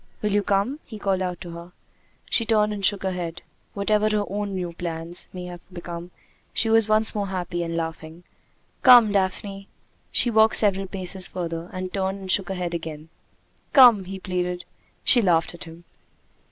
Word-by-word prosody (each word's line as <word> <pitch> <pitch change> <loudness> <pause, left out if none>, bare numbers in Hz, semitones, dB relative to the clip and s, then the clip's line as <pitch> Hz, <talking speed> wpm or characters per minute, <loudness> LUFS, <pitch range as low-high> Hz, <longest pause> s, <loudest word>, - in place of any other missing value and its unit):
"Will 210 - 0
you 205 +1 +2
come?" 200 +9 0
he 220 - -10
called 195 -2 -1
out 180 -1 -3
to 175 - -8
her. 170 +1 -10 0.5
She 230 - +1
turned 215 -2 +2
and 200 -1 -6
shook 200 0 +2
her 190 - -1
head. 175 -2 -5 0.3
Whatever 210 +1 +1
her 210 -1 0
own 200 0 -4
new 175 -2 -4
plans 165 0 -6
may 180 -1 -7
have 175 -1 -9
become, 175 -1 -7 0.5
she 225 - +1
was 225 -1 +4
once 215 +1 +4
more 205 -2 -2
happy 180 -2 -3
and 165 0 -3
laughing. 160 +1 -6 0.6
"Come, 245 -5 +8
Daphne!" 195 0 -2 0.4
She 240 - +3
walked 220 0 +4
several 195 -2 +3
paces 185 -1 +1
further 170 -1 -5
and 185 0 -6
turned 190 0 -1
and 190 -1 -4
shook 195 -1 +1
her 190 - -3
head 175 -1 -3
again. 160 -2 -6 0.6
"Come!" 240 -8 +7
he 195 +1 -6
pleaded. 180 -1 -3 0.4
She 245 - +6
laughed 170 -5 +2
at 175 +1 -8
him. 165 +1 -13
190 Hz, 180 wpm, -24 LUFS, 175-205 Hz, 0.6 s, Come